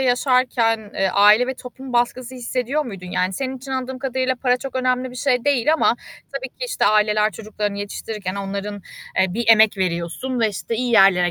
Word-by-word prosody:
yaşarken, 245 -4 +1
eee, 195 - +1
aile 210 +5 +5
ve 260 - -3
toplum 255 +1 -10
baskısı 245 +1 0
hissediyor 255 +4 -2
muydun? 195 -7 -8
Yani, 180 +1 -1
senin 265 +5 -3
için 260 +1 -10
anladığım 260 0 -3
kadarıyla 260 -1 -1
para 250 0 +1
çok 265 +1 -8
önemli 255 0 0
bir 250 - -11
şey 250 -2 +1
değil 285 0 +3
ama 315 -6 +3 0.4
tabii 265 -1 -4
ki, - - -7
işte, 470 - -1
aileler, 210 0 +3
çocuklarını 210 +1 -4
yetiştirirken 205 -1 -5
onların, 200 +1 -5 0.4
eee, 190 -1 +1
bir 235 0 -2
emek 220 -2 +6
veriyorsun 185 +8 -2
ve, 225 - +3
işte, 210 +3 -4
iyi 245 0 -1
yerlere 195 -5 +5
235 Hz, 185 wpm, -21 LUFS, 205-255 Hz, 0.4 s, emek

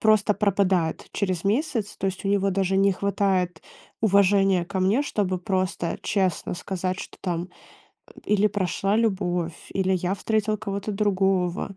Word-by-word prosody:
просто 215 -1 +4
пропадает 190 -5 +1
через 185 -4 -1
месяц, 220 0 0
то - - -2
есть 190 0 -4
у - - +1
него 200 0 +2
даже 190 0 0
не 195 0 +4
хватает 190 -3 0 0.4
уважения 195 -3 +4
ко 190 0 -3
мне, 195 +8 +3
чтобы 195 -9 -1
просто 185 -2 -1
честно 195 -4 0
сказать, 185 0 -3
что - - -9
там 175 -1 -2 0.8
или 210 0 +3
прошла 195 +1 0
любовь, 180 -6 0 0.2
или 190 -1 +1
я 185 +1 0
встретил 215 +1 0
кого-то 200 0 -4
другого, 195 -2 0
195 Hz, 145 wpm, -25 LUFS, 185-205 Hz, 0.8 s, просто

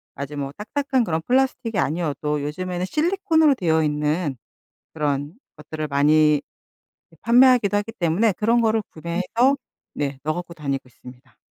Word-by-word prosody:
아주 140 +1 -6
뭐 140 -1 -3
딱딱한 260 +4 -1
그런 165 -6 -1
플라스틱이 250 -4 +1
아니어도 150 -2 -1
요즘에는 180 +4 -3
실리콘으로 320 - +2
되어 160 -7 +1
있는 150 0 -1 0.6
그런 145 0 -2 0.2
것들을 155 0 -6
많이 150 +1 +4 0.8
판매하기도 240 -3 +5
하기 205 +2 -4
때문에 195 +2 +1
그런 225 +5 +1
거를 220 -1 +2
구매해서 185 - 0 0.4
네, 140 -2 -3
넣어 155 +1 0
갖고 175 -1 -7
다니고 140 -4 -3
있습니다. 125 0 -16
170 Hz, 350 characters per minute, -22 LUFS, 150-230 Hz, 0.8 s, 판매하기도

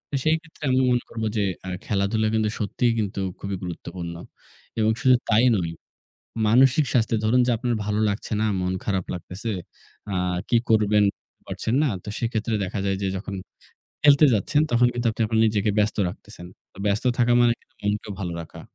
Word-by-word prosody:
এ - - +3
সেইক্ষেত্রে 160 0 -1
আমি 130 0 +3
মনে 120 -1 +2
করব 115 -1 -5
যে 105 - +2 0.2
আ - - -3 0.2
খেলাধুলা 105 +2 0
কিন্তু 110 -1 +1
সত্যিই 115 +3 +1
কিন্তু 100 -2 -2 0.2
খুবই 100 0 -4
গুরুত্বপূর্ণ 85 -1 -6 0.6
এবং 110 0 +3
শুধু 130 -1 +6
তাই 115 +3 +5
নয়, 85 -4 -1 0.8
মানসিক 130 +6 +5
স্বাস্থ্যে 115 -2 +2
ধরুন 120 +4 +4
যে - - +2
আপনার 120 +1 -1
ভালো 105 +1 0
লাগছে 100 +1 -4
না, 110 - +2
মন 90 0 -1
খারাপ 95 -3 -1
লাগতেছে, 90 +5 -6 0.6
আ - - -1 0.3
কী 120 - +3
করবেন 105 -1 +4 0.4
পারছেন 110 - -3
না। 155 - +2 0.2
তো - - -8
সেক্ষেত্রে 115 -1 -1
দেখা 95 - -4
যায় 95 -1 0
যে - - 0
যখন 100 +1 -6 0.7
খেলতে 145 +1 +7
যাচ্ছেন, 110 +8 +1
তখন 120 +1 +5
কিন্তু 120 0 -2
আপনি 110 - -2
আবার 110 +1 0
নিজেকে 105 -1 +1
ব্যস্ত 105 +1 +1
রাখতেছেন। 90 0 -10 0.3
তো - - -17
ব্যস্ত 100 +3 0
থাকা 120 0 +3
মানে 120 -1 +5
কিন্তু - - -34
মনকেও 105 +1 -2
ভালো 90 -3 -3
রাখা। 80 - -12
110 Hz, 180 wpm, -24 LUFS, 100-120 Hz, 0.8 s, খেলতে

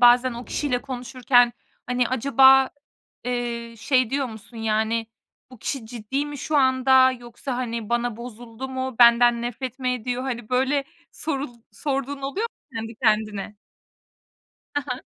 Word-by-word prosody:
bazen 245 +1 +6
o 235 +1 -7
kişiyle 255 -4 -1
konuşurken, 245 -2 +2 0.3
hani, 250 -1 +1
acaba, 265 +1 +5 0.5
eee, 235 -1 -3
şey 255 +1 +2
diyor 275 -1 0
musun? 225 +1 -11
Yani, 225 +1 0 0.4
"Bu 255 - -13
kişi 250 -1 -4
ciddi 245 +5 -3
mi 290 -1 -7
şu 305 +2 -1
anda 260 -1 +5
yoksa, 245 +1 -6
hani, 235 -3 -3
bana 240 -1 0
bozuldu 235 +1 -8
mu? 260 -1 -4
Benden 235 0 +6
nefret 245 +2 -4
mi 255 -1 -1
ediyor?" 250 +1 -3
Hani, 240 -4 -4
böyle 270 +2 +1 0.3
sorul 280 -4 -3 0.2
sorduğun 275 -1 -3
oluyor 375 +12 -2
mu - - -114 0.2
kendi 225 +1 -5
kendine? 215 -2 +1 1.2
Hı 290 - +1
hı. 250 +1 -3
245 Hz, 145 wpm, -24 LUFS, 235-265 Hz, 1.2 s, bazen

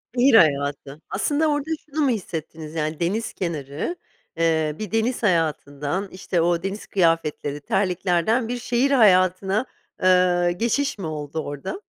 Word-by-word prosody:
Şehir 250 +1 +4
hayatı. 145 -4 +2
Aslında 305 +2 +1
orada 290 0 -1 0.2
şunu 305 +1 -3
mu - - +3
hissettiniz 160 -7 -5
yani 155 -1 -2
deniz 200 +7 -1
kenarı, 155 - -4 0.4
eee, 160 -2 +1
bir 215 -4 -5
deniz 230 +2 0
hayatından, 165 0 0
işte, 185 -2 -1
o 170 0 +1
deniz 195 +2 -5
kıyafetleri, 165 -5 0
terliklerden 185 - +1
bir 245 +1 -3
şehir 245 +3 0
hayatına, 195 -2 +4 0.4
eee, 180 -1 +4
geçiş 240 +6 0
mi 195 - -6
oldu 150 0 -5
orada? 145 - -5
180 Hz, 135 wpm, -23 LUFS, 155-225 Hz, 0.4 s, Şehir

